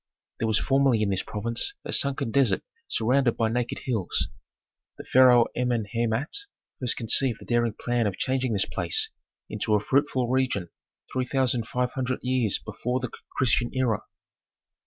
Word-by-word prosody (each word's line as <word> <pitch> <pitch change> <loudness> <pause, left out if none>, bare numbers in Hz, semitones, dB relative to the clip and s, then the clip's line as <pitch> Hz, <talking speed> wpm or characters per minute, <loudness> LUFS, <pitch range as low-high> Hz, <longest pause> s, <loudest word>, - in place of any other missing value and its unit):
There 115 - 0
was 110 -1 +3
formerly 135 -4 +2
in 100 - 0
this 95 - 0
province 115 - -1
a - - -3
sunken 140 -4 +2
desert 125 -8 +2 0.2
surrounded 125 +1 +1
by 115 -1 +1
naked 120 +1 -2
hills. 115 -9 0 0.7
The - - -8
pharaoh 125 -2 +6
Amenhemat 120 +1 -1 0.5
first 125 -2 -1
conceived 120 +1 +2
the - - -12
daring 120 -2 0
plan 120 -2 0
of 95 - -4
changing 130 -2 -1
this 100 -1 +2
place 85 -1 +1 0.4
into 105 - 0
a - - +3
fruitful 130 +2 +1
region, 125 -8 0 0.4
three 130 -1 0
thousand 125 -4 +1
five 125 +1 -1
hundred 130 -1 -3
years 125 -5 +1
before 120 +4 -3
the 125 -2 -5 0.3
Christian 120 -1 +2
era. 125 -5 +1
120 Hz, 155 wpm, -26 LUFS, 110-130 Hz, 0.7 s, pharaoh